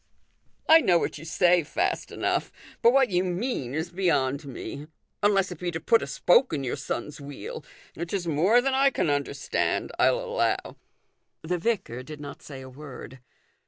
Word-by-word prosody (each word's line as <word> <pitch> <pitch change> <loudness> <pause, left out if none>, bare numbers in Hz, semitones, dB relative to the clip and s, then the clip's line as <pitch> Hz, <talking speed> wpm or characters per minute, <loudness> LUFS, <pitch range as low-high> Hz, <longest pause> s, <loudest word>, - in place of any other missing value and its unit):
" - - -41
I 325 +1 +8
know 175 - +4
what 160 - -2
you 155 - -10
say 175 +2 +4
fast 145 - -2
enough; - - -1 0.3
but 235 - +6
what 265 -3 +3
you 180 0 +2
mean 180 - -2
is 160 +2 -3
beyond 145 -6 +1
me: 140 +3 -7 0.3
unless 200 -2 +3
it 175 - -7
be 180 - -2
to 165 -1 -3
put 230 +6 +3
a - - -4
spoke 175 - +3
in 140 -3 -1
your 125 - -2
son's 145 +4 -5
wheel: 140 0 -7 0.3
which 170 0 -6
is 195 -3 -2
more 175 +10 +4
than 270 +1 0
I 275 +1 +5
can 165 - 0
understand, 145 0 -1
I'll - - +4
allow." - - -1 0.7
The 175 +2 -1
vicar 185 - -1
did 150 +3 -9
not 145 -1 -9
say 135 -3 -9
a 130 - -9
word. 130 -1 -10
170 Hz, 185 wpm, -26 LUFS, 145-205 Hz, 0.7 s, I